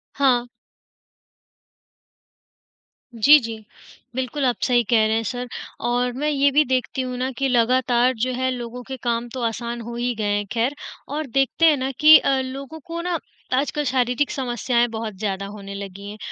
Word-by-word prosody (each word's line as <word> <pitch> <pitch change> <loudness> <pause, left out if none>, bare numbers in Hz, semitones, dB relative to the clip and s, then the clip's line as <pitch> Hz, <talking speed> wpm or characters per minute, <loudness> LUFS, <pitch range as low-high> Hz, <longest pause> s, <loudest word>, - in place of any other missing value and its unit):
हाँ। 250 -3 +2 2.7
जी, 290 +7 +7
जी। 225 -2 -6 0.6
बिल्कुल 260 +2 -2
आप 245 - +2
सही 245 -2 +3
कह 220 -2 +4
रहे 220 - +1
हैं 225 - 0
सर 245 +2 -4 0.4
और 245 +1 +1
मैं 295 +4 -1
ये 280 -1 +3
भी 300 +2 +5
देखती 260 +1 -1
हूँ 250 -1 -4
ना 255 +1 -1
कि 275 - +1
लगातार 250 +1 +3
जो 255 - -2
है 260 +1 0
लोगों 245 0 -6
के 265 +2 -7
काम 235 0 -1
तो 255 - -4
आसान 235 +1 -3
हो 235 +1 -7
ही 245 +1 -1
गए 205 -1 0
हैं 205 - -2
ख़ैर 240 +5 0 0.4
और 305 -2 -3
देखते 270 +6 +2
हैं 305 -3 +5
ना 260 +1 -2
कि 310 +1 +10
अ, 270 -1 +1
लोगों 275 +4 -7
को 335 0 -5
ना 345 -2 -1 0.3
आजकल 290 +3 0
शारीरिक 250 +2 +1
समस्याएँ 240 -2 0
बहुत 220 -2 -5
ज़्यादा 195 -2 -2
होने 200 -1 -8
लगी 200 0 -8
हैं। 210 - -8
250 Hz, 175 wpm, -22 LUFS, 230-270 Hz, 2.7 s, कि